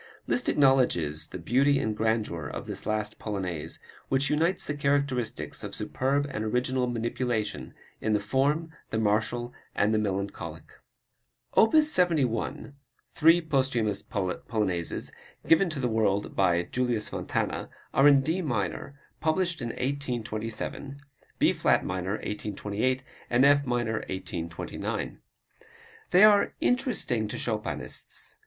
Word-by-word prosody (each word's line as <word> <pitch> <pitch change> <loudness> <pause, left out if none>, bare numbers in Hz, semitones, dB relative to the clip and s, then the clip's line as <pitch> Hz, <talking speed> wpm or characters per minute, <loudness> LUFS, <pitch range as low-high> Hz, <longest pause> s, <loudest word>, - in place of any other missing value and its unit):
Liszt 250 - +1
acknowledges 90 - +3
the - - -7
beauty 135 - +3
and 110 -4 -1
grandeur 110 -8 -1
of - - -6
this - - -6
last 110 0 -2
Polonaise, 95 -7 -4 0.3
which 135 +2 +2
unites 165 +5 +1
the 145 - -1
characteristics 140 -4 -1
of - - -5
superb 140 +2 0
and 110 - -3
original 125 +3 0
manipulation 115 -2 -2 0.3
of 110 - +1
the 105 - +3
form, 140 +9 0 0.2
the - - -2
martial 110 +3 0 0.2
and 105 +2 +2
the 110 - +3
melancholic. 100 -1 -3 0.9
Opus 300 +7 +5
71, 150 - +1 0.4
three 165 +3 +5
posthumous 130 - 0
Polonaises, 95 -2 -2 0.4
given 170 +3 +5
to 155 -3 -4
the 125 - +1
world 105 -3 0
by 85 -3 +3
Julius 120 -1 -1
Fontana, - - -2 0.2
are 135 - +6
in 140 -2 +7
D 160 +7 -1
minor, 135 - -3 0.2
published 165 0 0
in 120 - -2
1827, 125 +1 -4 0.4
B - - +4
flat - - +2
major, 95 +1 -2
1828, 105 +4 -2 0.3
and 120 +3 +4
F 140 -1 +5
minor, 120 -2 0
1829. 85 -8 -4 0.9
They 180 +3 +6
are 210 -1 +6
interesting 245 - +1
to - - -5
Chopinists. - - -3
120 Hz, 125 wpm, -28 LUFS, 105-140 Hz, 0.9 s, in